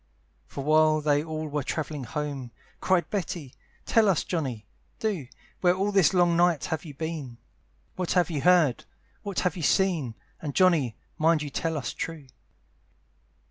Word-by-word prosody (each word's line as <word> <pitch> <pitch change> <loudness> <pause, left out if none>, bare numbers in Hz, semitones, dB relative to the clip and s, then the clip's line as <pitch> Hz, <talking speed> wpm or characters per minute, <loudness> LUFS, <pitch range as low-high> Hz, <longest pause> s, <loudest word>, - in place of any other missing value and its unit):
For 140 - -6
while 155 +1 +4
they 145 -1 +2
all 155 -1 -4
were 150 0 -2
travelling 150 -1 -4
home, 140 -1 -4 0.3
Cried 185 -2 +1
Betty, 170 -8 -3 0.3
"Tell 220 -3 +4
us 185 - +2
Johnny, 130 - -3 0.3
do, 195 - -2 0.3
"Where 180 -1 +3
all 195 +2 0
this 195 -6 +4
long 175 -2 +3
night 175 -3 +3
you - - -6 0.2
have 140 - -17
been, 155 -7 -5 0.6
"What 180 0 -1
you 180 - +6
have 155 -5 -4
heard, 175 -8 +4 0.4
what 200 -3 -6
you - - +1
have 170 0 -7
seen, 165 - +1 0.3
"And 145 -3 -5
Johnny, 165 - +3 0.2
mind 160 -1 +3
you 145 - -6
tell 160 +2 -1
us 140 - -3
true." 165 -3 -5
160 Hz, 160 wpm, -27 LUFS, 145-180 Hz, 0.6 s, you